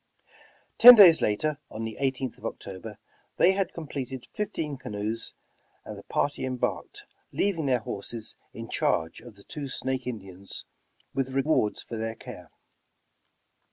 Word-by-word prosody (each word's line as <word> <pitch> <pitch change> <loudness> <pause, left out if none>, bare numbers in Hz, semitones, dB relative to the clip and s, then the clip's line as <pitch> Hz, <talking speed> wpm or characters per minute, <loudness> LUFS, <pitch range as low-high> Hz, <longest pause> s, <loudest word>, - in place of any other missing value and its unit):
Ten 245 +1 +13
days 180 -7 +8
later, 145 +8 0
on 110 - -6
the 110 -1 -5
18th 130 -2 -2
of - - -11
October, 100 +2 -8 0.4
they 185 - +6
had 190 -1 -1
completed 135 -5 -6
fifteen 165 -8 -3
canoes 110 -2 -5 0.5
and - - -7
the - - -10
party 145 - -1
embarked, 130 -1 -3 0.3
leav 200 -4 0
ing 150 - -1
their 125 -3 +2
horses 110 +2 -7 0.2
in 115 0 -8
charge 85 -8 0
of 120 -4 -13
the 100 - -16
two 145 +3 -6
Snake 130 0 -3
Indians 95 -5 -6 0.5
with 135 0 -1
rewards 135 -5 +1
for 115 - -7
their 110 0 -3
care. - - -11
130 Hz, 145 wpm, -27 LUFS, 110-150 Hz, 0.5 s, Ten